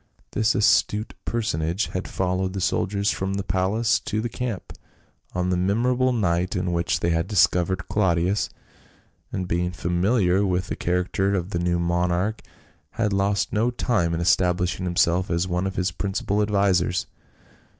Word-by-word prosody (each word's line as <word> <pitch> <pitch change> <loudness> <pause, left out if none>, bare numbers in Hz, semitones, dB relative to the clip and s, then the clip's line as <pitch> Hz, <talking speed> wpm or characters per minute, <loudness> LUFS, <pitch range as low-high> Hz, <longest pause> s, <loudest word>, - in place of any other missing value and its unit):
This 110 +2 +1
astute 105 +1 +2
personage 95 -4 -1
had 95 - -3
followed 95 0 -1
the 95 - -3
soldiers 100 +2 0
from 95 +1 -2
the 100 - -2
palace 95 +6 +1
to 105 - -3
the 120 +2 -2
camp 115 -6 -5 0.6
on 90 0 0
the - - +2
memor 105 +8 +1
able 130 +1 +2
night 90 -6 0
in 90 -1 -1
which 85 0 0
they 85 - +1
had 85 +1 0
discovered 95 -2 +2
Claudius, 95 0 +1 0.8
and 90 -1 -3
being 90 +1 0
familiar 90 +3 +1
'ith 90 0 -4
the - - -2
character 90 +3 0
of 90 +1 -3
the 85 - -1
new 85 0 +1
monarch 90 +4 0 0.5
had 105 -3 0
lost 100 +1 0
no 115 +3 +2
time 90 -9 0
in 85 - -2
establishing 90 +1 +1
himself 90 +1 +2
as 85 +2 0
one 90 +1 -1
of 95 - -5
his 90 -1 0
principal 100 +3 -1
advisers. 100 -4 +1
95 Hz, 160 wpm, -24 LUFS, 90-100 Hz, 0.8 s, astute